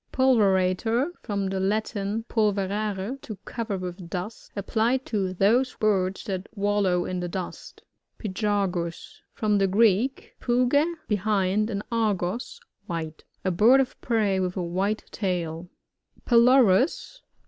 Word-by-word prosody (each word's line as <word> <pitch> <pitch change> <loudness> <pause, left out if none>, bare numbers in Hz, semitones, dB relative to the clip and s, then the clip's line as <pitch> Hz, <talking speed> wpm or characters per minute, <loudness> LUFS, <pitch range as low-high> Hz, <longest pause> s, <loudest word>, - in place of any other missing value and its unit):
Pulverator. 225 - +2
— - - -35
From 200 -3 -2
the 190 0 -2
Latin, 205 +2 -1
pul" 215 -3 +2
verare, 205 +4 -3
to 215 - -7
cover 230 -4 -3
with 180 -1 -7
dust. 185 +5 -6
Ap 200 - -3
plied 240 +4 +1
to 195 -5 -1
those 230 +8 +2
birds 195 -3 0
that 190 -1 -4
wallow 200 -3 +1
in 185 -1 -3
the 180 - -3
dust 180 +1 -7 0.3
Pygargus. 195 -4 -2
— - - -52
From 210 -2 +1
the 195 - +3
Greek, 220 +6 +2
puge, 255 +7 +2
behind, 210 0 +1
and 205 -2 -3
ctrgos^ 220 - -1 0.3
white. 160 -3 -5 0.2
A 185 - +2
bird 225 +9 +5
of 265 -2 -2
prey 215 -5 +1
with 185 0 -2
a 180 - -1
white 190 +5 -1
tail 175 -3 -3 0.6
Pylorus. 250 - +4
205 Hz, 135 wpm, -26 LUFS, 185-230 Hz, 0.6 s, bird